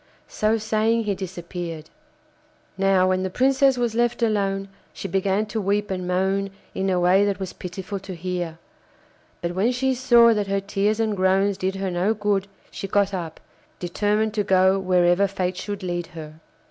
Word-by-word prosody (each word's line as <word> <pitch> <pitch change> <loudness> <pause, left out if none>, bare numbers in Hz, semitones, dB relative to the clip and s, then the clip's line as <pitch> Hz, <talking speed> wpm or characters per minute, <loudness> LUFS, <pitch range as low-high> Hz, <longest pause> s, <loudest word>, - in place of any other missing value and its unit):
So 215 +1 +1
saying 220 +1 +1
he 210 -2 0
disappeared. 175 -3 -6 0.8
Now, 190 -1 +3
when 185 0 +1
the 190 - -2
Princess 265 +4 +3
was 240 -2 0
left 240 +1 +1
alone 195 -3 0 0.3
she - - -6
began 195 +2 0
to 215 +1 -3
weep 200 +1 0
and 185 -1 -3
moan 190 +2 0 0.2
in 190 0 -1
a 180 -1 +1
way 180 +3 +4
that 200 -1 0
was 190 -2 -5
pitiful 185 +2 -6
to 190 -1 -8
hear; 175 -1 -4 0.9
but 170 0 -2
when 200 +7 +2
she 260 +1 0
saw 240 -2 +5
that 210 -2 -1
her 195 0 0
tears 200 +2 0
and 220 -2 +1
groans 190 +1 +2
did 190 +1 -2
her 195 -1 -2
no 185 +5 +1
good, 205 -2 0 0.2
she 195 - -5
got 200 0 +1
up, 170 -4 -5 0.4
determined 210 +4 0
to 210 -1 0
go 190 0 +3
wherever 180 +1 +3
fate 185 -2 -2
should 205 -2 -5
lead 175 -1 -3
her. 155 0 -9
195 Hz, 175 wpm, -23 LUFS, 185-210 Hz, 0.9 s, saw